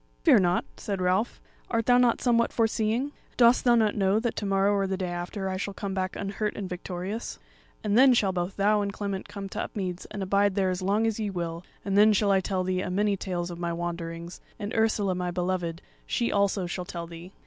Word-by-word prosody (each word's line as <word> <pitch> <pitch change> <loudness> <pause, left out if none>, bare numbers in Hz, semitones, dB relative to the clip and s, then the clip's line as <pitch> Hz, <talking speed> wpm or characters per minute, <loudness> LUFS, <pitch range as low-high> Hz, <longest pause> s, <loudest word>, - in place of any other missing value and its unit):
"Fear - - +7
nought," 180 -1 +2
said 200 -2 -3
Ralph; 185 +5 +1 0.3
"art 230 -2 0
thou 245 0 +5
not 245 -2 +3
somewhat 235 -2 +3
foreseeing? 225 +4 0 0.3
Dost 240 0 +5
thou 240 -1 +6
not 220 -3 +3
know 200 0 +2
that 235 0 -2
to 205 - -2
morrow 195 +1 +3
or 195 -1 +1
the 190 0 -2
day 185 -2 -2
after 175 +3 -4
I 185 0 -2
shall 200 +1 -4
come 200 -2 -4
back 185 -1 -2
unhurt 205 +1 -3
and 200 - -4
victorious; 185 +4 -5 0.5
and 210 -1 +1
then 260 +1 +7
shall 200 -5 +2
both 180 +1 -3
thou 205 +1 +3
and 200 0 -1
Clement 200 -1 -4
come 200 -1 -6
to 210 - -4
Upmeads 185 -3 -4
and 205 -2 -5
abide 200 +1 +2
there 190 -2 +2
as 180 +1 -3
long 205 +4 +1
as 225 -1 -1
ye 210 -2 -1
will; 170 -2 -4 0.2
and 195 -1 -1
then 210 +1 +6
shall 205 0 +2
I 195 - +4
tell 185 0 -1
thee 185 0 0
a - - -3
many 205 +2 +1
tales 180 -2 -3
of 170 - -8
my 170 -1 -2
wanderings; 170 0 -5 0.2
and 210 -1 -5
Ursula 220 -4 +2
my 180 0 -2
beloved, 175 -1 -2 0.2
she 235 -2 0
also 200 -2 +1
shall 180 +1 -4
tell 170 -1 -5
thee." 170 +2 -10
195 Hz, 225 wpm, -27 LUFS, 180-210 Hz, 0.5 s, Fear